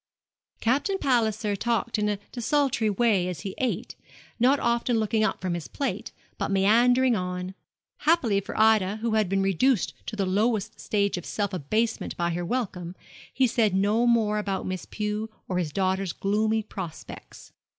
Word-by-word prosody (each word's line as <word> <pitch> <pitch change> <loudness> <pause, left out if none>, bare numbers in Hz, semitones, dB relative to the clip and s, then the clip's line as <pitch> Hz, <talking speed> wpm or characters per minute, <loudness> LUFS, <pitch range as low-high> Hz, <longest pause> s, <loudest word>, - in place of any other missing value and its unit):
Captain 280 - +1
Palliser 220 - +1
talked 230 +1 -1
in 210 0 +1
a 205 - -1
desultory 255 -2 +1
way 205 -3 +2
as 175 -5 -5
he 195 - -5
ate, 255 -2 -2 0.4
not 265 +4 +4
often 235 0 +1
looking 220 0 +1
up 220 - 0
from 185 -2 -2
his 170 -2 -4
plate, 280 - -3 0.3
but - - -1
meandering 235 +6 +4
on. 180 -1 -3 0.4
Happily 245 -11 +2
for 200 - -6
Ida, 215 -3 +4
who 230 - 0
had 215 -4 +2
been 195 0 +1
reduced 195 +5 +2
to 220 - -4
the 200 -2 0
lowest 205 +2 0
stage 200 -2 0
of 175 - -11
self 205 -2 -2
abasement 215 +8 -1
by 170 0 0
her 175 +1 -2
welcome, 180 -5 -3 0.4
he 265 - +2
said 225 -5 +2
no 210 +5 +2
more 220 -3 +3
about 195 -2 -2
Miss 185 -1 -4
Pew 210 +1 -3 0.2
or 180 -1 -1
his 165 -4 -2
daughter's 190 0 0
gloomy 215 +2 0
prospects. 185 -6 -9
210 Hz, 165 wpm, -26 LUFS, 190-235 Hz, 0.4 s, not